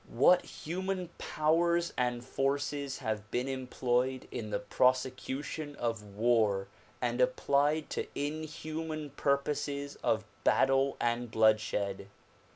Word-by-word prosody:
What 175 Hz, +9 st, +5 dB
human 185 Hz, +2 st, -4 dB
powers 170 Hz, +2 st, +2 dB
and 125 Hz, -1 st, -1 dB
forces 140 Hz, +1 st, -1 dB
have 110 Hz, -3 st, -3 dB
been 125 Hz, +2 st, -1 dB
employed 130 Hz, -1 st, -1 dB
in 110 Hz, -2 st, -4 dB
the 105 Hz, -, 0 dB
prosecution 130 Hz, +6 st, 0 dB
of 115 Hz, -4 st, -2 dB
war 110 Hz, -4 st, +2 dB, 0.3 s
and -, -, 0 dB
applied 155 Hz, -, +2 dB
to -, -, -2 dB
inhuman 155 Hz, +1 st, -4 dB
purposes 140 Hz, 0 st, -1 dB
of 110 Hz, -1 st, 0 dB, 0.2 s
battle 135 Hz, +1 st, +3 dB
and 120 Hz, 0 st, 0 dB
bloodshed! 110 Hz, -3 st, +2 dB
135 Hz, 105 wpm, -31 LUFS, 120-150 Hz, 0.3 s, What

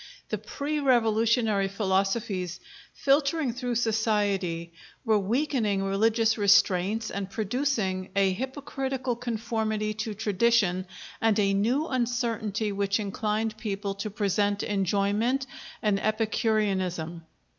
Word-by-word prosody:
The -, -, -2 dB
pre 300 Hz, +1 st, -3 dB
revolutionary 225 Hz, -5 st, +2 dB
philosophies, 195 Hz, -1 st, -1 dB, 0.4 s
filtering 280 Hz, -1 st, +2 dB
through 245 Hz, -1 st, -3 dB
society, 205 Hz, -7 st, 0 dB, 0.3 s
were 220 Hz, -2 st, +4 dB
weakening 220 Hz, -2 st, 0 dB
religious 220 Hz, +3 st, +2 dB
restraints 205 Hz, +1 st, +3 dB
and 195 Hz, -1 st, -4 dB
producing 215 Hz, -4 st, -1 dB
a 195 Hz, -1 st, +3 dB
hypocritical 265 Hz, +1 st, -3 dB
conformity 220 Hz, -2 st, -2 dB
to 215 Hz, 0 st, -4 dB
tradition 205 Hz, -3 st, +2 dB, 0.3 s
and 225 Hz, -2 st, +3 dB
a 200 Hz, -2 st, +3 dB
new 240 Hz, +10 st, +1 dB
uncertainty 230 Hz, -4 st, -1 dB
which 200 Hz, +1 st, 0 dB
inclined 215 Hz, +1 st, -2 dB
people 200 Hz, -2 st, -3 dB
to 200 Hz, +2 st, -4 dB
present 205 Hz, 0 st, 0 dB
enjoyment 205 Hz, +6 st, +1 dB, 0.4 s
and 205 Hz, -2 st, +2 dB
epicureanism. 195 Hz, -7 st, -1 dB
215 Hz, 100 wpm, -27 LUFS, 195-235 Hz, 0.4 s, were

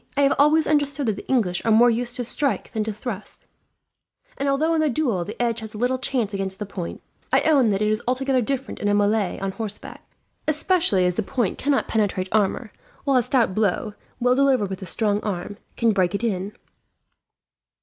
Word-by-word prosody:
I -, -, +3 dB
have 275 Hz, -, +4 dB
always 305 Hz, +2 st, +5 dB
understood 290 Hz, -2 st, +1 dB
that 215 Hz, -3 st, 0 dB
the -, -, -9 dB
English 200 Hz, -9 st, +1 dB
are 230 Hz, -, 0 dB
more 235 Hz, +2 st, +6 dB
used 240 Hz, +2 st, -2 dB
to 250 Hz, -, -1 dB
strike 275 Hz, +4 st, -1 dB
than 220 Hz, -2 st, -1 dB
to 220 Hz, -, -2 dB
thrust, 210 Hz, -1 st, -7 dB, 0.9 s
and 280 Hz, -, -1 dB
although 310 Hz, +4 st, +2 dB
in 320 Hz, -, +2 dB
the 310 Hz, -, +2 dB
duel 240 Hz, -, 0 dB
the 210 Hz, +6 st, -8 dB
edge 235 Hz, -1 st, 0 dB
has 220 Hz, 0 st, -8 dB
little 250 Hz, +4 st, 0 dB
chance 245 Hz, -6 st, -1 dB
against 195 Hz, -1 st, -3 dB
the 210 Hz, -, -4 dB
point, 185 Hz, -3 st, -6 dB, 0.3 s
I -, -, +4 dB
own 280 Hz, -7 st, +4 dB
that 200 Hz, 0 st, +1 dB
it -, -, +2 dB
is 215 Hz, +1 st, 0 dB
altogether 260 Hz, +1 st, +1 dB
different 265 Hz, +2 st, -3 dB
in 205 Hz, -, -1 dB
a 205 Hz, -, +3 dB
melee 205 Hz, -1 st, +1 dB
on 195 Hz, 0 st, -2 dB
horseback; 210 Hz, 0 st, -7 dB, 0.4 s
especially 310 Hz, -, +2 dB
as 180 Hz, -, +2 dB
the 200 Hz, -, -1 dB
point 215 Hz, -1 st, -2 dB
cannot 280 Hz, -1 st, +1 dB
penetrate 195 Hz, -4 st, 0 dB
armour, 215 Hz, +1 st, 0 dB, 0.3 s
while 275 Hz, -2 st, +3 dB
a -, -, +5 dB
stout 240 Hz, -4 st, +1 dB
blow, 210 Hz, +1 st, 0 dB, 0.3 s
well 250 Hz, 0 st, +3 dB
delivered 260 Hz, -7 st, +2 dB
with 190 Hz, -, -5 dB
a 190 Hz, -, -6 dB
strong 205 Hz, +2 st, +1 dB
arm, 200 Hz, 0 st, -4 dB, 0.2 s
can 230 Hz, -1 st, +3 dB
break 185 Hz, -2 st, +1 dB
it 200 Hz, -, -3 dB
in. 200 Hz, -2 st, -2 dB
225 Hz, 205 wpm, -23 LUFS, 205-265 Hz, 0.9 s, more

